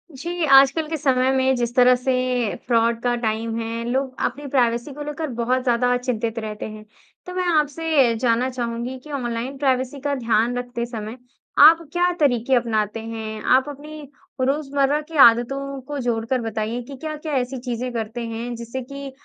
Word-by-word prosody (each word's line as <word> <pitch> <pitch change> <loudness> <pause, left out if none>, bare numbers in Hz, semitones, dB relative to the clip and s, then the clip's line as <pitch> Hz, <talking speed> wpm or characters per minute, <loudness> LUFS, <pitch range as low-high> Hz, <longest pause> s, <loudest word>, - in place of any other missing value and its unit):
जी, 345 +4 -4
आजकल 275 +3 +5
के 320 - -2
समय 260 -2 +2
में 265 0 +2
जिस 240 -1 -2
तरह 250 -1 +6
से 250 +1 -1 0.6
फ्रॉड 230 -1 +2
का 245 -1 +1
टाइम 225 +1 -1
है, 230 0 -4
लोग 265 +1 -1
अपनी 290 - -4
प्राइवेसी 245 0 0
को 295 - -9
लेकर 295 +2 -4
बहुत 255 +2 +1
ज़्यादा 245 0 +2
चिंतित 235 -2 -2
रहते 215 -1 -5
हैं। 215 0 -9 0.4
तो 360 - -7
मैं 365 -1 0
आपसे 295 -4 +2
जानना 245 +1 +1
चाहूँगी 240 0 -4
कि 300 - -11
ऑनलाइन 250 0 -3
प्राइवेसी 265 0 0
का 285 0 -1
ध्यान 235 -1 +1
रखते 245 -1 -3
समय 225 -1 -7 0.5
आप 325 +2 +8
क्या 355 0 +2
तरीके 260 -3 +2
अपनाते 225 -3 0
हैं? 220 -1 -6
आप 260 +3 +3
अपनी 300 +2 -9 0.4
रोज़मर्रा 280 +1 +1
की 310 0 -8
आदतों 275 +4 -3
को 290 -1 -4
जोड़कर 240 0 -1
बताइए 225 +1 -3
कि 275 +3 -9
क्या-क्या 310 +1 -5
ऐसी 255 +1 -2
चीज़ें 245 0 -4
करते 230 +1 -4
हैं, 230 +2 -5
जिससे 235 +3 -6
कि 275 +2 -8
250 Hz, 170 wpm, -22 LUFS, 230-280 Hz, 0.6 s, आप